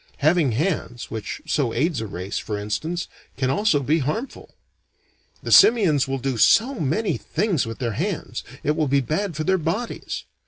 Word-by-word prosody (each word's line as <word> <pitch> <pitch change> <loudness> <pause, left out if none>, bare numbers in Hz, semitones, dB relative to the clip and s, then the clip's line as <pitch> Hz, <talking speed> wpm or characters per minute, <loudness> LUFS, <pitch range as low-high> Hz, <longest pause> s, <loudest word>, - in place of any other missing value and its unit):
Having 155 -3 +3
hands, 135 - -2
which 110 -2 -5
so 130 -6 0
aids 145 -1 0
a 110 - -4
race, 95 0 -4
for 105 - -4
instance, 160 +12 -3 0.3
can 130 -1 +1
also 160 -5 +2
be 155 +5 +2
harmful. 190 - -4 0.9
The - - -4
simians 180 - +6
will 135 0 -1
do 130 -1 -2
so 250 - +5
many 165 +6 0
things 180 - -1
with 115 - -6
their 115 -3 -2
hands, - - -3 0.2
it 150 - +1
will 155 -1 +1
be 140 +1 +3
bad 165 - -2
for 155 - -2
their 190 +2 +2
bodies. 180 +9 -3
150 Hz, 170 wpm, -23 LUFS, 125-180 Hz, 0.9 s, simians